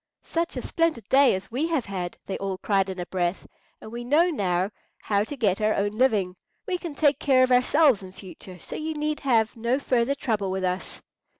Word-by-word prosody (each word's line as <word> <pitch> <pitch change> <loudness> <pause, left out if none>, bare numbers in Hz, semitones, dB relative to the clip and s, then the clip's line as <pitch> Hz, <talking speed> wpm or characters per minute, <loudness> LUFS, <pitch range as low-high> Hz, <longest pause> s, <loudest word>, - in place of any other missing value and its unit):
"Such 335 +1 -2
a - - -4
splendid 330 - -1
day 270 -5 +5
as 190 +2 -7
we 275 +7 0
have 320 -7 -1
had!" 185 -3 -5
they 195 - -4
all 195 -1 -3
cried 195 -1 +1
in 190 -1 -5
a 175 - -3
breath. 175 0 -2 0.3
"And 220 - -11
we 240 +1 -5
know 310 +8 +3
now 190 - 0 0.3
how 200 -1 0
to 285 +6 -7
get 210 -4 +1
our 215 0 +2
own 205 +1 0
living; 210 -6 +1 0.3
we 370 -5 -2
can 335 -5 -6
take 290 -1 +3
care 260 -2 +4
of 255 - +1
ourselves 255 -1 +4
in 190 -1 -10
future, 185 -1 -11
so - - -9
you 315 0 -4
need 300 0 -2
have 230 -5 +1
no 235 +3 0
further 260 -1 +1
trouble 215 -8 -1
with 190 0 -2
us." 185 0 -3
225 Hz, 215 wpm, -25 LUFS, 190-280 Hz, 0.3 s, day